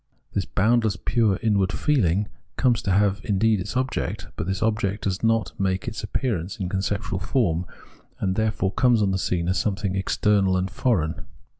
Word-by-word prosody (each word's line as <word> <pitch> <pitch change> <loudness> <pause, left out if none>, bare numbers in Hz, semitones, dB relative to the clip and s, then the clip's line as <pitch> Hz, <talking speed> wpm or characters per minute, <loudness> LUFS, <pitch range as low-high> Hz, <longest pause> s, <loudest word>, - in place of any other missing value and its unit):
This - - 0
boundless 110 0 +2
pure 110 -5 +1
inward 100 -4 +2
feel 145 -5 +2
ing 95 +5 +1 0.3
comes 125 -4 +2
to 100 - -1
have 100 0 +2
indeed 105 +1 +2
its 90 +7 -3
object; 130 +1 -2
but 80 - -4
this 95 +2 -1
object 105 -2 0
does 95 -1 -1
not 115 -1 +1
make 95 -1 0
its 110 - -4
appearance 105 -4 -2
in 95 -2 -2
conceptual 95 -1 -2
form, 90 -4 0 0.5
and 95 -1 0
therefore 105 -2 0
comes 120 -2 +3
on 100 - +2
the 95 - 0
scene 85 -2 -1
as 95 0 +1
something 100 -1 -1
external 95 0 +2
and 90 0 -2
foreign. 85 -11 0
100 Hz, 175 wpm, -24 LUFS, 95-110 Hz, 0.5 s, comes